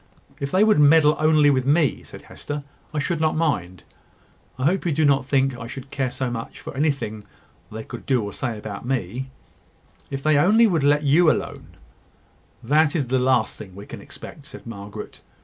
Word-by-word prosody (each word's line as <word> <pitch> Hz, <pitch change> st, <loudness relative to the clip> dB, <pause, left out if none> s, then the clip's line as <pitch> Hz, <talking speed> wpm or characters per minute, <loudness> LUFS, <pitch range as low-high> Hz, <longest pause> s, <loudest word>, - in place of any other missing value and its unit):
"If 140 Hz, -, -3 dB
they 190 Hz, +7 st, +3 dB
would 215 Hz, -7 st, +4 dB
meddle 150 Hz, +1 st, +6 dB
only 155 Hz, -2 st, +4 dB
with 130 Hz, -1 st, 0 dB
me," 150 Hz, -1 st, +2 dB
said -, -, -13 dB
Hester, 145 Hz, 0 st, -7 dB, 0.3 s
"I 155 Hz, -, -5 dB
should 160 Hz, +2 st, -1 dB
not 155 Hz, -1 st, +1 dB
mind. 95 Hz, -, -1 dB, 0.7 s
I 130 Hz, -, -2 dB
hope 185 Hz, +6 st, +2 dB
you 170 Hz, -, 0 dB
do 155 Hz, +1 st, +2 dB
not 140 Hz, -2 st, +2 dB
think 135 Hz, -2 st, +1 dB
I 120 Hz, -1 st, -8 dB
should 135 Hz, +2 st, -9 dB
care 135 Hz, -2 st, -1 dB
so 125 Hz, 0 st, -3 dB
much 115 Hz, -1 st, -6 dB
for -, -, -9 dB
anything 135 Hz, -8 st, -1 dB, 0.5 s
they 110 Hz, +1 st, -6 dB
could -, -, -10 dB
say 135 Hz, -, +4 dB
or 105 Hz, -4 st, -1 dB
do 120 Hz, -4 st, -3 dB
about 105 Hz, -1 st, -7 dB
me. 130 Hz, +1 st, -3 dB, 0.8 s
If 135 Hz, 0 st, -5 dB
they 155 Hz, -1 st, +3 dB
only 210 Hz, +10 st, +5 dB
would 170 Hz, -9 st, +1 dB
let 145 Hz, +1 st, +3 dB
you 155 Hz, +4 st, +5 dB
alone -, -, -3 dB, 0.4 s
" -, -, -34 dB
"That 155 Hz, 0 st, +4 dB
is 140 Hz, -7 st, -1 dB
the 130 Hz, 0 st, +2 dB
last 125 Hz, -3 st, +1 dB
thing 95 Hz, -4 st, -10 dB
we 100 Hz, +1 st, -9 dB
can -, -, -9 dB
expect," 145 Hz, -1 st, -12 dB
said 140 Hz, -, -12 dB
Margaret. 100 Hz, -3 st, -9 dB
140 Hz, 200 wpm, -23 LUFS, 125-155 Hz, 0.8 s, meddle